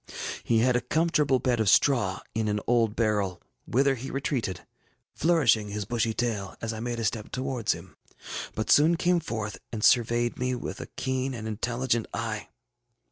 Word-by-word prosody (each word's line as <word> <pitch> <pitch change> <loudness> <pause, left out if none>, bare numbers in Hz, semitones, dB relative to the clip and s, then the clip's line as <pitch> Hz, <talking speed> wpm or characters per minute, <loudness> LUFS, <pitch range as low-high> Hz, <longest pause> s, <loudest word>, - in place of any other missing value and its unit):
He 115 - +2
had 125 +1 +3
a 125 - +2
comfortable 150 0 +2
bed 125 -2 0
of 110 -3 +3
straw 110 -9 +3
in 110 -1 -1
an 105 0 0
old 115 -3 +2
barrel, 105 -5 0 0.3
whither 135 +3 +3
he 135 +1 -6
retreated, 130 -8 -2 0.5
flourishing 135 -11 +3
his 105 0 -3
bushy 115 +1 0
tail 110 -6 -2
as 115 0 -3
I 110 - -6
made 120 0 -3
a 115 - -1
step 105 +1 -2
towards 130 -4 -1
him, 85 +2 -11 0.6
but 110 - -1
soon 160 +3 +6
came 175 +1 +2
forth 110 - -4
and 110 -2 -4
surveyed 120 0 +3
me 125 0 0
with 125 - -5
a - - -7
keen 130 0 -1
and 110 -1 -5
intelligent 120 +2 -1
eye. - - -3
120 Hz, 175 wpm, -27 LUFS, 110-130 Hz, 0.6 s, soon